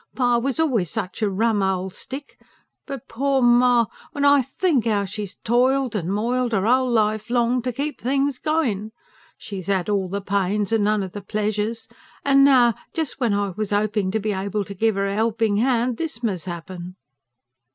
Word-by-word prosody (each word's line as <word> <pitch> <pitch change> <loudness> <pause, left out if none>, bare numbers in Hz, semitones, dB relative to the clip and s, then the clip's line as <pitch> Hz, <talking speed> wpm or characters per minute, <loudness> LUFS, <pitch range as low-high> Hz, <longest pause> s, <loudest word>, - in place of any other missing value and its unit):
"Pa 245 -2 +2
was 270 +5 -2
always 240 - +1
such 220 -2 -4
a 210 - +2
rum 210 +2 +1
old 190 -1 -1
stick. 275 +2 -8 0.5
But 275 -4 -7
poor 275 +3 0
ma... 240 -1 +5 0.3
when 285 0 0
I 285 -1 +6
THINK 275 - 0
how 205 -2 +1
she's 200 0 -6
toiled 255 +1 +2
and 180 -3 -2
moiled 235 +3 0
'er 195 -1 +1
whole 255 +2 +3
life 215 -2 +1
long, 245 +1 +2
to 250 +1 -2
keep 285 +5 -4
things 275 +1 0
going. 230 -10 -1 0.4
She's 195 -3 -7
'ad 190 -1 0
all 195 -3 0
the 200 +2 -2
pains 200 +1 -1
and 225 -2 +2
none 210 -1 +2
of 190 - -6
the 205 - -7
pleasures; 215 +2 -2 0.4
and 275 -1 +5
now, 250 -4 +6 0.2
just 320 -5 -3
when 235 -6 +1
I 200 0 0
was 210 +2 -4
hoping 210 -1 0
to 220 +3 0
be 210 0 -1
able 200 +2 -2
to 200 - -7
give 220 +1 +1
'er 195 - +1
a 195 - -1
helping 220 -1 +1
hand, 240 0 +1
THIS 315 -8 -5
must 190 -8 -2
happen." 175 +1 -7
220 Hz, 190 wpm, -22 LUFS, 200-250 Hz, 0.5 s, I